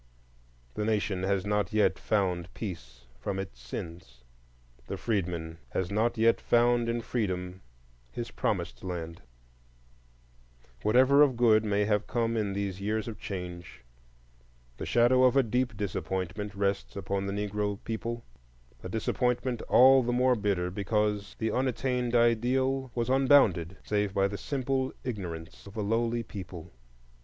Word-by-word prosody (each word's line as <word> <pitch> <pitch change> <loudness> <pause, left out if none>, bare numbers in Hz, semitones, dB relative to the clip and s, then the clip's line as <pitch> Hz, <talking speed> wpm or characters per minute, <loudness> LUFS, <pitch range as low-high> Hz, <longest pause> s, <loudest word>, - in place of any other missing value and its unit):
The 105 - -2
Nation 105 -3 0
has 95 0 0
not 105 -2 0
yet 110 -1 +2
found 90 -4 0
peace 65 - -7
from 95 +10 -3
its 95 -10 -6
sins; 60 -2 -8 0.6
the - - -4
freedman 85 -6 -2
has 95 0 -1
not 115 +3 +1
yet 115 +1 +3
found 120 0 +3
in 120 0 -1
freedom 95 -6 -3 0.5
his - - -5
promised - - -2
land. 85 -2 -5 1.6
Whatever 130 +6 +5
of 135 -5 +4
good 110 -3 +5
may 105 -1 +1
have 105 0 0
come 115 -2 0
in 105 -3 0
these 100 -1 -3
years 110 +2 -1
of 115 - -6
change, 90 -7 -7 0.9
the - - -5
shadow 120 +2 +4
of 130 +1 +5
a 135 - +6
deep 120 -1 -1
disappointment 100 +1 -3
rests 100 -11 -1
upon 100 0 -2
the 100 - -2
Negro 105 0 -2
people,—a 75 - -8
disappointment 120 +3 -1
all 130 +1 +7
the 120 0 -1
more 125 +1 +3
bitter 100 -5 -1
because 105 +1 -1
the 110 0 -1
unattained 125 -1 0
ideal 130 +3 +2
was 120 -1 0
unbounded 130 - +4
save 105 -2 -1
by 100 0 +3
the 100 - -5
simple 135 -1 -1
ignorance 90 -8 -6
of 100 +3 -11
a - - 0
lowly 115 +2 0
people. 90 -5 -9
105 Hz, 140 wpm, -29 LUFS, 95-120 Hz, 1.6 s, all